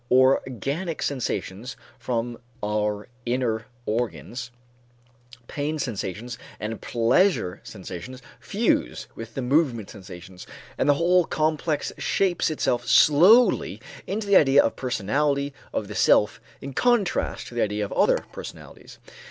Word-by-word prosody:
Organic 135 - +1
sensations 125 -3 -3 0.2
from 120 -1 -3 0.2
our 105 0 -1 0.2
inner 120 -2 -1 0.2
organs, 120 +2 -3 1.0
pain 150 +1 -3
sensations 115 - -4 0.2
and 110 +1 -5
pleasure 120 - +2
sensations 95 +5 -8 0.2
fuse - - 0
with 115 0 -9
the 135 - -2
movement 125 -6 +1
sensations, 95 -3 -11 0.3
and 145 - +1
the 145 - +6
whole 175 +3 +3
complex 155 0 -1
shapes 185 -4 +1
itself 125 -5 -1
slowly 185 +12 +5 0.3
into 210 +2 -2
the 200 -1 +6
idea 140 -1 +6
of - - +1
the - - -17
personality 140 +4 0 0.2
of 105 - -3
the 105 - -7
self 105 0 +3 0.2
in 135 0 -7
contrast 240 - +1
to - - -11
the 120 - -1
idea 105 0 0
of - - -9
other - - +2
personalities. - - -10
125 Hz, 125 wpm, -25 LUFS, 110-150 Hz, 1.0 s, the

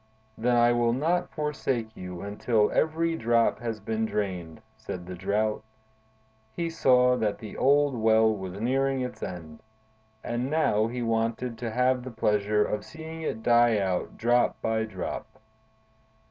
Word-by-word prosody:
"Then 120 +2 +1
I 120 0 +5
will 120 -1 +2
not 170 +7 0
forsake 135 -7 -2
you 90 -1 -7
until 105 +2 +1
every 165 +1 +1
drop 115 -4 +2
has 115 -2 -4
been 110 +2 -2
drained," 100 -4 -4
said 110 -5 -7
the 90 - -7
Drought. 105 +4 -1 0.9
He 170 -1 -2
saw 125 -5 +4
that 105 -3 -1
the 110 - -9
old 145 0 +3
Well 110 -1 +4
was 95 -1 -6
nearing 135 +3 +1
its 125 -1 -5
end, 80 -4 -7 0.6
and 120 +2 -2
now 115 -9 +2
he 120 +1 -4
wanted 115 +1 -1
to 120 -1 -3
have 125 +2 +1
the 130 - -6
pleasure 105 -2 +1
of 105 -1 -3
seeing 160 0 -9
it 110 -8 -4
die 120 -1 +4
out 95 -3 -2
drop 120 +1 +2
by 110 0 0
drop. 95 -5 -5
115 Hz, 150 wpm, -27 LUFS, 105-125 Hz, 0.9 s, I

